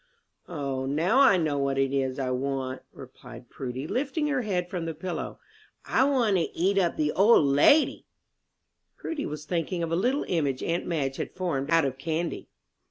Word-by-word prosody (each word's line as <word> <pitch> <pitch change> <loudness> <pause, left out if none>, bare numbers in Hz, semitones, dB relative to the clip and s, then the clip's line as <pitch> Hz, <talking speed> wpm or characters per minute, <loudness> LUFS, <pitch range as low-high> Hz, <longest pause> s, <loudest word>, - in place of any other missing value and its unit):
"O, 140 -5 -3
now 165 - +2
I 265 -9 +6
know 155 -4 0
what 140 -1 0
it 135 0 +1
is 130 -1 -1
I 130 -2 -2
want," 130 0 -3
replied 125 -2 -13
Prudy, 130 +1 -5
lifting 280 - -1
her 280 -3 0
head 185 -6 -2
from 175 -2 -4
the 165 -1 -4
pillow, 180 +3 -5 0.5
"I 260 - +3
want 245 -8 +2
to 170 - 0
eat 195 +3 +2
up 175 -3 +1
the 150 -1 +1
old 200 -4 +5
lady!" 145 - +4 0.9
Prudy 310 -3 -4
was 150 0 -7
thinking 170 0 -2
of 165 - -3
a - - +2
little 250 - 0
image 145 -7 -1
aunt 170 +1 -2
Madge 140 -6 -2
had - - -5
formed 165 -7 -2
out 165 -2 +4
of 135 -1 -3
candy. 160 +3 -3
160 Hz, 180 wpm, -27 LUFS, 135-185 Hz, 0.9 s, I